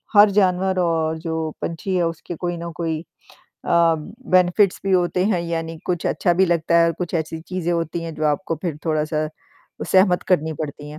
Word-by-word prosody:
हर 205 +1 +8
जानवर 190 -1 +2
और 160 -2 +1
जो 165 0 -4 0.3
पंछी 175 +3 -3
है, 180 - +2
उसके 165 +1 -6
कोई 175 +1 -3
न 170 0 -6
कोई 165 -2 -2 0.5
अ, 170 -1 +1 0.4
बेनिफिट्स 180 +2 +4
भी 195 - +1
होते, 180 0 +2
हैं 195 -5 +1
यानी 165 -1 -4
कुछ 175 -2 -1
अच्छा 175 - +1
भी 190 - +4
लगता 170 0 +2
है 170 - +5
और 165 - +1
कुछ 180 -1 -4
ऐसी 160 0 -2
चीज़ें 175 0 -3
होती 165 0 -2
हैं 165 -1 -6
जो 155 - -3
आपको 155 +2 -1
फिर 170 -5 -2
थोड़ा-सा 155 -1 0 0.6
सहमत 185 -1 +4
करनी 160 -3 +2
पड़ती 145 0 -7
है। 150 - -9
170 Hz, 190 wpm, -21 LUFS, 160-180 Hz, 0.6 s, हर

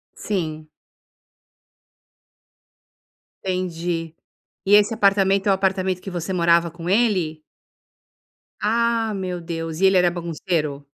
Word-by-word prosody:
Sim. 155 -6 -4 2.7
Entendi, 170 -3 -3 0.5
e 200 - +5
esse 210 +2 +5
apartamento 195 -1 +2
é - - +5
o 195 - +5
apartamento 190 -1 0
que 195 - -7
você 180 +1 -4
morava 170 -1 +3
com 170 +1 -8
ele? 185 -7 +1 1.2
Ah, 230 0 +1
meu 185 -2 -4
Deus, 165 -1 -5
e 195 - +5
ele 190 0 +4
era 180 -1 +4
bagunceiro? 165 -4 -3
180 Hz, 110 wpm, -22 LUFS, 165-195 Hz, 2.7 s, e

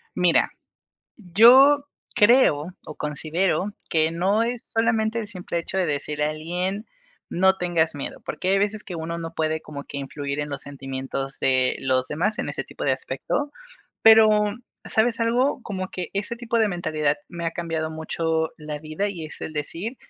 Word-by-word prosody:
Mira, 180 -2 +3 0.7
yo 250 +9 +6 0.3
creo 195 - +4
o 155 - -9
considero 160 +6 -1 0.2
que 160 -1 +3
no 190 +6 +1
es 235 0 -3
solamente 225 0 +1
el 215 - -6
simple 180 -3 -4
hecho 170 +3 -3
de 185 - +2
decirle 150 0 -1
a 150 - +1
alguien 180 +6 -3 0.5
no 190 +2 +3
tengas 170 -3 +1
miedo, 140 - -6
porque 185 - -3
hay 195 +1 +4
veces 205 +1 0
que 180 - -7
uno 165 +1 -4
no 165 -1 -6
puede 160 0 0
como 145 -2 -8
que 140 - -7
influir 140 +1 -4
en 145 - -3
los 140 -2 -5
sentimientos 135 -1 -5
de 130 -1 +2
los 130 -1 0
demás 205 +8 -1
en - - -2
ese - - -3
tipo - - -7
de - - +2
aspecto, 290 0 -2 0.5
pero, 220 0 +8 0.6
¿sabes 230 +1 +1
algo?, 245 +4 +2
como 185 -3 -4
que 180 -2 -5
ese 205 +4 -3
tipo 235 -1 -1
de 220 -1 +3
mentalidad 155 -5 0
me 170 -1 -5
ha 165 - -1
cambiado 165 -2 -3
mucho 160 0 -1
la 150 -1 -5
vida 155 +7 -3
y 175 -5 -6
es 155 - -11
el - - -5
decir 170 - -3
170 Hz, 175 wpm, -24 LUFS, 155-210 Hz, 0.7 s, pero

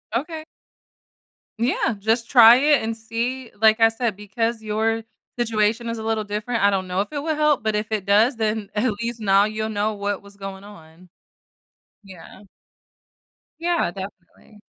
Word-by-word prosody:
Okay. 310 +5 -3 1.2
Yeah, 235 -2 +1
just 225 +3 0
try 235 -3 +9
it 290 +3 +3
and 225 0 -3
see. 230 +3 -4
Like 220 +1 +5
I 225 - +7
said, 225 -2 -2
because 220 +3 -3
your 220 +1 -1 0.3
situation 225 0 0
is 230 - -3
a 220 - -6
little 220 -1 -1
different, 210 +2 -3
I 200 - +6
don't 190 -2 -1
know 180 +1 0
if 205 - -6
it 295 - -3
will 315 +1 -1
help, 300 -4 +2
but 220 -1 0
if 215 +1 -3
it 210 -3 -2
does, 220 +5 +3
then, 215 -2 -2
at 215 +2 +1
least, 235 0 -4
now 200 -2 +4
you'll 215 +1 -2
know 215 0 -1
what 205 -1 -3
was 200 0 -17
going 195 -1 -8
on. 180 -3 -15 0.9
Yeah. 190 0 -14 1.2
Yeah, 335 - 0
definitely. 195 +2 -11
220 Hz, 165 wpm, -22 LUFS, 205-235 Hz, 1.2 s, try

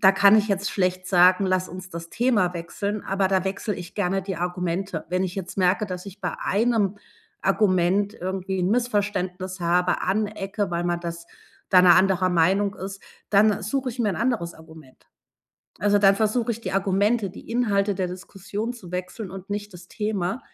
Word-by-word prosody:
da 190 - +7
kann 200 +2 +6
ich 215 0 +2
jetzt 200 0 0
schlecht 185 -1 -1
sagen, 185 +1 +5
lass 185 -1 0
uns 185 +1 -9
das 170 0 -7
Thema 210 -8 +1
wechseln, 200 +5 -4
aber 195 -1 +1
da 190 -1 +1
wechsle 200 +2 -2
ich 175 -1 -9
gerne 195 -1 0
die 190 -2 -4
Argumente. 180 0 -3
Wenn 180 +1 +1
ich 185 -1 -3
jetzt 190 0 -6
merke, 185 +3 +3
dass 185 0 -6
ich 200 +1 -10
bei - - -1
einem 210 -2 +1 0.5
Argument 195 0 +2
irgendwie 190 0 -3
‘n 180 +2 +1
Missverständnis 195 -5 -1
habe, 175 +1 +2
anecke, 205 0 -1
weil 170 0 -1
man 175 -1 -1
das 170 0 -6 0.4
da 180 - +7
‘ner 180 -1 +7
anderer 185 -1 +3
Meinung 190 +4 +2
ist, 195 +1 -7 0.3
dann 210 0 +4
suche 260 +6 -1
ich 245 +1 -7
mir 215 -4 +1
‘n - - -3
anderes 230 -8 -1
Argument. 160 -4 -16 0.7
Also, 205 +1 +3
dann 195 -1 +6
versuche 220 +3 0
ich 225 - -7
die - - -4
Argumente, 195 +2 +1
die 195 - -12
Inhalte 205 -4 +1
der 185 -2 0
Diskussion 195 +5 -5
zu 180 -7 -12
wechseln 180 +2 -5
und 195 +1 -9
nicht 205 0 -4
das 175 0 -12
Thema. 215 -1 -2
195 Hz, 185 wpm, -24 LUFS, 180-205 Hz, 0.7 s, da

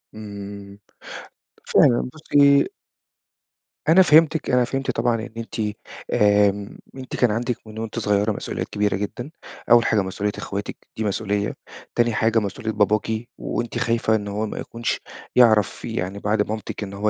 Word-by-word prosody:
إمم، 100 -1 -9 0.9
فعلًا، 120 0 +4
بُصي 145 -2 +4 1.2
أنا 175 +4 +7
فهمتِك. 160 -2 +4
أنا 125 0 +4
فهمت 135 +1 -2
طبعًا 115 0 +1
إن 120 - -7
أنتِ، 115 0 -6 0.5
آمم، 105 -1 +2 0.2
أنتِ 130 -1 -7
كان 120 -4 +3
عندِك 120 +2 -1
من 110 +1 -8
وأنتِ 115 +1 -4
صغيّرة 105 0 +1
مسؤوليات - - -4
كبيرة 105 -1 0
جدًا. 120 +8 -5 0.4
أوّل 120 0 +7
حاجة 110 - +3
مسؤوليّة 95 +2 -2
إخواتِك، 100 +1 -5 0.2
دي 110 - -1
مسؤوليّة. 105 0 -1 0.4
تاني 120 -1 +2
حاجة 115 +1 +2
مسؤوليّة 105 +2 -3
باباكِ، 105 +1 +1 0.3
وأنتِ 120 0 -3
خايفة 115 -2 +1
إن 105 -1 -2
هو 105 +2 -2
ما 105 - -6
يكونش 115 0 -3 0.4
يعرف 110 -5 +4
يعني 95 +2 -3
بعد 105 0 0
مامتِك 110 0 -4
إن 100 -1 -7
هو 105 +2 0
110 Hz, 145 wpm, -22 LUFS, 105-120 Hz, 1.2 s, أنا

